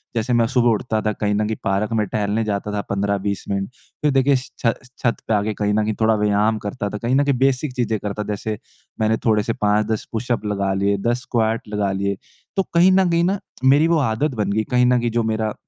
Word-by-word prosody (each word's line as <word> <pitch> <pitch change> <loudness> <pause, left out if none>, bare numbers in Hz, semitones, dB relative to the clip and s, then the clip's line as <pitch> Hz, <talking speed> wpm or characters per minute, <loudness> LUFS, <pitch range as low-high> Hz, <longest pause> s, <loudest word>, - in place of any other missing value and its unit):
जैसे 115 +2 0
मैं 120 -1 +4
सुबह 120 0 +2
उठता 110 0 0
था, 110 - 0
कहीं 105 0 -1
न 105 +1 +1
कहीं 110 - -2
पार्क 100 +2 0
में 105 -1 +1
टहलने 105 +3 -1
जाता 105 -1 -2
था 105 - -1
15-20 100 0 -1
मिनट। 100 -1 -1 0.3
फ़िर 150 - +2
देखिए 135 +1 +4
श 130 +1 -4
छ 115 -1 +3 0.3
छत 120 - +2
पे - - +1
आके 105 +1 +1
कहीं 105 0 -1
न 110 +1 +2
कहीं 110 +1 -1
थोड़ा 110 0 +4
व्यायाम 105 +1 +2
करता 100 0 -3
था। 105 - -5
कहीं 120 +5 0
न 140 - +4
कहीं 140 -2 +2
बेसिक 135 +1 +1
चीज़ें 120 -3 0
करता 105 +1 -4
था - - -11
जैसे 105 +1 -3 0.4
मैंने 110 0 +2
थोड़े 105 -2 +3
से 115 +1 -1
5-10 105 +1 0
पुशअप 120 -1 -2
लगा 100 -2 0
लिए, 100 +1 +1
10 120 +5 -1
स्क्वाट 115 -3 -1
लगा 105 -2 0
लिए। 100 0 -1 0.4
तो 195 - +3
कहीं 175 +2 +6
न 190 -1 +4
कहीं 170 0 +2
न 200 +1 -1 0.3
मेरी 145 +4 +5
वो 170 - +3
आदत 135 +2 0
बन 100 - 0
गई 110 +2 +1
कहीं 125 0 +4
न 125 0 +4
कहीं 120 0 -1
जो 115 0 +1
मेरा 110 -1 -1
110 Hz, 240 wpm, -21 LUFS, 105-125 Hz, 0.4 s, कहीं